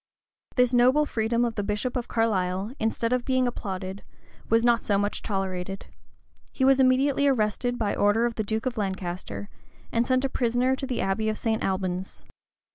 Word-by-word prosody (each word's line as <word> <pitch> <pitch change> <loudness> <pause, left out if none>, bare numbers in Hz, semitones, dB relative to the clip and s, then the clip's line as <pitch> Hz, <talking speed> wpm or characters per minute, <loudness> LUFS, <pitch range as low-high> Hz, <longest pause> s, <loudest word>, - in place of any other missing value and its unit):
This 250 -1 +3
noble 255 +5 +5
freedom 235 -2 0
of 235 - -2
the 210 - -2
bishop 210 +5 -2
of 245 -2 -2
Carlisle, 195 -2 0
instead 230 +2 0
of 250 -1 0
being 260 -1 +1
applauded, 190 -4 -5 0.5
was 230 +1 +3
not 235 -1 +4
so 200 - +1
much 205 +1 0
as - - -20
tolerated: 195 -2 -3 0.7
he 265 - 0
was 270 0 +5
immediately 270 +2 +3
arrested 245 0 +1
by 215 -4 0
order 205 +3 +3
of 240 - -1
the 220 - -2
duke 220 +3 -2
of 250 -3 -2
Lancaster, 180 - -4 0.4
and 235 +1 +1
sent 255 +1 +2
a - - +3
prisoner 250 +1 +1
to 270 - -5
the 255 - -2
abbey 200 +3 0
of 215 - -2
St. 225 -1 -1
Albans. 185 -1 -3
225 Hz, 185 wpm, -26 LUFS, 195-250 Hz, 0.7 s, noble